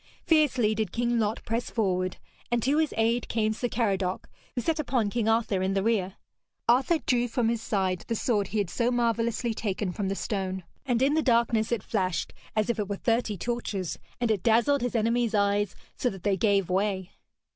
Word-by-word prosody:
Fiercely 270 Hz, -9 st, +3 dB
did 215 Hz, -4 st, -2 dB
King 240 Hz, +2 st, 0 dB
Lot 215 Hz, 0 st, -1 dB
press 230 Hz, +2 st, -2 dB
forward, 185 Hz, -4 st, 0 dB, 0.3 s
and 240 Hz, -2 st, 0 dB
to 285 Hz, +4 st, +2 dB
his 315 Hz, -2 st, +1 dB
aid 230 Hz, +2 st, +1 dB
came 220 Hz, -1 st, +1 dB
Sir 245 Hz, +3 st, -2 dB
Caradoc, 195 Hz, -6 st, -1 dB, 0.3 s
who 245 Hz, -, 0 dB
set 325 Hz, +4 st, 0 dB
upon 245 Hz, -7 st, 0 dB
King 225 Hz, -1 st, 0 dB
Arthur 225 Hz, -4 st, +1 dB
in 190 Hz, +1 st, 0 dB
the 195 Hz, -, +1 dB
rear. 200 Hz, -4 st, 0 dB, 0.5 s
Arthur 265 Hz, +8 st, +4 dB
drew 245 Hz, -5 st, +1 dB
from 235 Hz, -1 st, 0 dB
his 230 Hz, -1 st, -1 dB
side 190 Hz, -5 st, -1 dB
the 230 Hz, -, -1 dB
sword 210 Hz, -3 st, +1 dB
he 215 Hz, -, -3 dB
had 200 Hz, -4 st, 0 dB
so 235 Hz, +4 st, +1 dB
marvellously 235 Hz, -1 st, 0 dB
taken 205 Hz, -3 st, -2 dB
from 195 Hz, +2 st, -3 dB
the 195 Hz, -, -1 dB
stone, 190 Hz, -2 st, -3 dB, 0.2 s
and 245 Hz, 0 st, +2 dB
in 280 Hz, +2 st, +3 dB
the 315 Hz, -, +3 dB
darkness 235 Hz, -4 st, +2 dB
it 235 Hz, -4 st, 0 dB
flashed 185 Hz, -5 st, -1 dB, 0.2 s
as 215 Hz, -1 st, +2 dB
if 235 Hz, -2 st, -1 dB
it 205 Hz, -1 st, -2 dB
were 200 Hz, -, -1 dB
thirty 225 Hz, -1 st, 0 dB
torches, 210 Hz, -5 st, -3 dB, 0.2 s
and 240 Hz, -2 st, +1 dB
it 205 Hz, -4 st, 0 dB
dazzled 235 Hz, +6 st, +3 dB
his 245 Hz, 0 st, -2 dB
enemies' 230 Hz, 0 st, +1 dB
eyes, 200 Hz, -1 st, +1 dB, 0.2 s
so 250 Hz, -, 0 dB
that 195 Hz, -5 st, -9 dB
they 200 Hz, -1 st, +2 dB
gave 200 Hz, -2 st, +2 dB
way. 190 Hz, 0 st, -1 dB
225 Hz, 200 wpm, -27 LUFS, 200-240 Hz, 0.5 s, Arthur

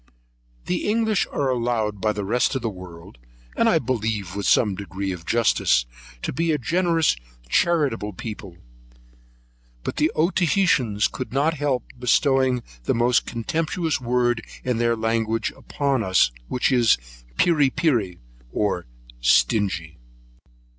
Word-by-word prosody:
The 180 Hz, +3 st, -1 dB
English 220 Hz, -2 st, +1 dB
are 135 Hz, -2 st, 0 dB
allowed 115 Hz, -5 st, -1 dB
by 110 Hz, -, +2 dB
the 105 Hz, -1 st, -4 dB
rest 125 Hz, +6 st, +1 dB
of 130 Hz, -, -2 dB
the 115 Hz, -, -1 dB
world, 90 Hz, -6 st, -12 dB, 0.4 s
and -, -, +3 dB
I -, -, +4 dB
believe 110 Hz, -6 st, -2 dB
with 100 Hz, -, -2 dB
some 105 Hz, -4 st, +4 dB
degree 95 Hz, 0 st, -4 dB
of 85 Hz, -3 st, -8 dB
justice, 65 Hz, -, +2 dB, 0.4 s
to -, -, -2 dB
be 165 Hz, +5 st, 0 dB
a 150 Hz, -, +2 dB
generous, 165 Hz, -, +1 dB, 0.3 s
charitable 140 Hz, -, +1 dB
people; 100 Hz, -3 st, -8 dB, 1.3 s
but -, -, -4 dB
the -, -, +2 dB
Otaheiteans 165 Hz, -, +2 dB
could 130 Hz, -, -7 dB
not 145 Hz, +5 st, +1 dB
help 140 Hz, -4 st, -1 dB, 0.2 s
bestowing 130 Hz, 0 st, +2 dB, 0.2 s
the -, -, +1 dB
most 120 Hz, +1 st, +2 dB
contemptuous 160 Hz, +6 st, -2 dB
word 120 Hz, -1 st, +1 dB, 0.2 s
in 125 Hz, -2 st, -1 dB
their 115 Hz, 0 st, +2 dB
language 115 Hz, 0 st, -1 dB
upon 140 Hz, -3 st, -1 dB
us, 95 Hz, -, +3 dB, 0.2 s
which 125 Hz, -, 0 dB
is, 120 Hz, -3 st, +4 dB, 0.4 s
Peery 150 Hz, -5 st, +4 dB
Peery, 120 Hz, -, 0 dB, 0.3 s
or 95 Hz, -6 st, -1 dB, 0.3 s
Stingy. 80 Hz, -, +1 dB
120 Hz, 135 wpm, -23 LUFS, 100-140 Hz, 1.3 s, I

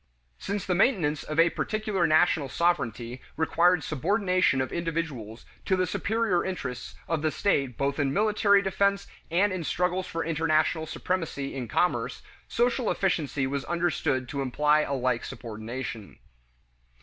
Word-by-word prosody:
Since 200 Hz, -1 st, -3 dB
the 185 Hz, -, 0 dB
maintenance 175 Hz, -, +2 dB
of 155 Hz, +1 st, -3 dB
a 170 Hz, 0 st, +5 dB
particular 215 Hz, -5 st, 0 dB
national 155 Hz, -2 st, +3 dB
sovereignty 125 Hz, -8 st, -1 dB, 0.2 s
required 170 Hz, +1 st, +3 dB
subordination 180 Hz, -, +1 dB
of 130 Hz, -, -2 dB
individuals 155 Hz, -10 st, -4 dB, 0.2 s
to 190 Hz, -, +2 dB
the 185 Hz, 0 st, +1 dB
superior 210 Hz, 0 st, 0 dB
interests 130 Hz, -10 st, -5 dB
of 165 Hz, -2 st, -1 dB
the 155 Hz, -, +1 dB
state 140 Hz, -, 0 dB
both 140 Hz, +2 st, -1 dB
in 140 Hz, -2 st, +1 dB
military 205 Hz, +2 st, +3 dB
defense 200 Hz, +1 st, +1 dB, 0.2 s
and 185 Hz, +4 st, +2 dB
in 180 Hz, -2 st, -3 dB
struggles 180 Hz, +3 st, -1 dB
for 165 Hz, -2 st, -3 dB
international 160 Hz, 0 st, +1 dB
supremacy 160 Hz, -5 st, -3 dB
in 125 Hz, -3 st, -4 dB
commerce, 180 Hz, +10 st, 0 dB, 0.2 s
social 240 Hz, 0 st, +1 dB
efficiency 155 Hz, -7 st, 0 dB
was 135 Hz, +1 st, -2 dB
understood 160 Hz, -6 st, 0 dB
to 140 Hz, -, -3 dB
imply 150 Hz, +3 st, +2 dB
a 140 Hz, -, -1 dB
like 125 Hz, -2 st, 0 dB
subordination. 115 Hz, -2 st, -7 dB
160 Hz, 140 wpm, -27 LUFS, 135-185 Hz, 0.2 s, a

